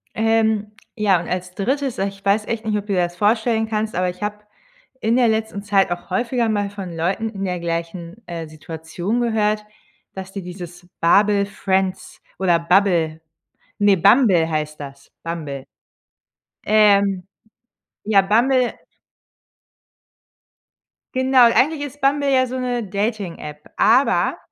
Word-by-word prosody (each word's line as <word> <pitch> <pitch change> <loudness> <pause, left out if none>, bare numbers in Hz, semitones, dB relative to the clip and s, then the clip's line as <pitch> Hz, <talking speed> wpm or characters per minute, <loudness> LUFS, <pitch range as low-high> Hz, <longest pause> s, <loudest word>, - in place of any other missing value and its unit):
Ähm, 220 -1 +1 0.2
ja 205 -5 +2
und 170 - -7
als 180 0 -4
3., 265 +5 -1
ich 195 0 -4
weiß 205 +2 +2
echt 230 -1 -4
nicht, 215 -1 0
ob 205 - -5
du 200 - -1
dir 185 - +1
das 175 0 -3
vorstellen 220 +2 +1
kannst, 220 0 -2
aber 180 +1 +1
ich 180 +3 -8
habe 210 0 -5 0.6
in 225 +2 +2
der 250 -2 +4
letzten 220 -2 -1
Zeit 195 -2 +2
auch 175 +2 -5
häufiger 235 +4 0
mal 205 -2 0
von 195 -4 -7
Leuten 190 +7 -1
in 195 -3 -6
der 180 -2 -2
gleichen, 170 +4 -5
äh, 165 -2 -6
Situation 160 +7 -4
gehört, 215 -3 0 0.5
dass 190 0 -8
die 195 - -6
dieses 175 -1 -10
Babel 200 +4 +4
Friends 190 -1 -2 0.2
oder 175 -3 +3
Bubble, 170 -3 +2 0.6
ne 205 -1 +4
Bumble 195 -4 +4
heißt 155 -1 -3
das. 140 0 -10
Bumble. 150 -5 -5 1.0
Ähm. 200 -3 +3 0.8
Ja 200 -2 +5
Bumble 240 +5 +2 2.4
Genau 260 -1 +5
eigentlich 285 +6 +3
ist 290 0 -7
Bumble 280 +1 +2
ja 260 -1 +3
so 255 +1 -5
'ne 245 -2 -2
Dating-App, 195 -7 -4
aber, 250 +5 +3
200 Hz, 140 wpm, -20 LUFS, 175-225 Hz, 2.4 s, Ja